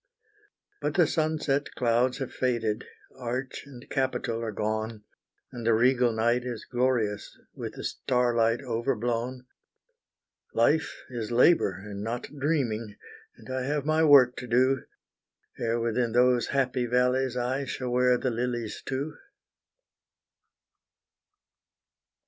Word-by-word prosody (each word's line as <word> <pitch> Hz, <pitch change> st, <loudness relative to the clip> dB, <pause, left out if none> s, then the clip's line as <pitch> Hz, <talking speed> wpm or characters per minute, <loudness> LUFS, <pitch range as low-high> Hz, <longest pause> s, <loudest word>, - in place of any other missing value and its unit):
But -, -, -1 dB
the -, -, +5 dB
sunset 155 Hz, -3 st, 0 dB
clouds 125 Hz, +1 st, +2 dB
have 135 Hz, -3 st, -5 dB
faded, 115 Hz, -4 st, -1 dB, 0.3 s
arch 125 Hz, +3 st, -4 dB
and 130 Hz, -2 st, -12 dB
capital 125 Hz, -4 st, -1 dB
are 115 Hz, -1 st, -3 dB
gone, 110 Hz, +1 st, -3 dB, 0.5 s
And 120 Hz, -2 st, -7 dB
the 115 Hz, 0 st, +3 dB
regal 125 Hz, +1 st, +3 dB
night 120 Hz, +2 st, +1 dB
is 120 Hz, -3 st, -5 dB
glorious, 120 Hz, -5 st, -1 dB, 0.2 s
with -, -, -6 dB
the -, -, -7 dB
starlight 120 Hz, -1 st, +1 dB
overblown; 120 Hz, +1 st, -2 dB, 1.1 s
Life 145 Hz, +7 st, +2 dB
is 120 Hz, -2 st, -4 dB
labor 120 Hz, -, +4 dB
and 100 Hz, 0 st, -7 dB
not 115 Hz, +2 st, -3 dB, 0.2 s
dreaming, 120 Hz, -8 st, -1 dB, 0.4 s
and -, -, -11 dB
I 130 Hz, -, -1 dB
have 145 Hz, -1 st, -1 dB
my 155 Hz, +1 st, +3 dB
work 135 Hz, -5 st, +7 dB
to 125 Hz, -, -6 dB
do, 130 Hz, +2 st, +2 dB, 0.7 s
Ere 115 Hz, 0 st, 0 dB
within 115 Hz, 0 st, 0 dB
those 125 Hz, 0 st, +4 dB
happy 130 Hz, -2 st, 0 dB
valleys 125 Hz, +1 st, +1 dB
I 130 Hz, +3 st, -1 dB
shall 130 Hz, -1 st, -4 dB
wear 125 Hz, 0 st, +4 dB
the 130 Hz, 0 st, -1 dB
lilies 120 Hz, -2 st, -3 dB
too. 135 Hz, +4 st, -3 dB
125 Hz, 120 wpm, -27 LUFS, 115-130 Hz, 1.1 s, work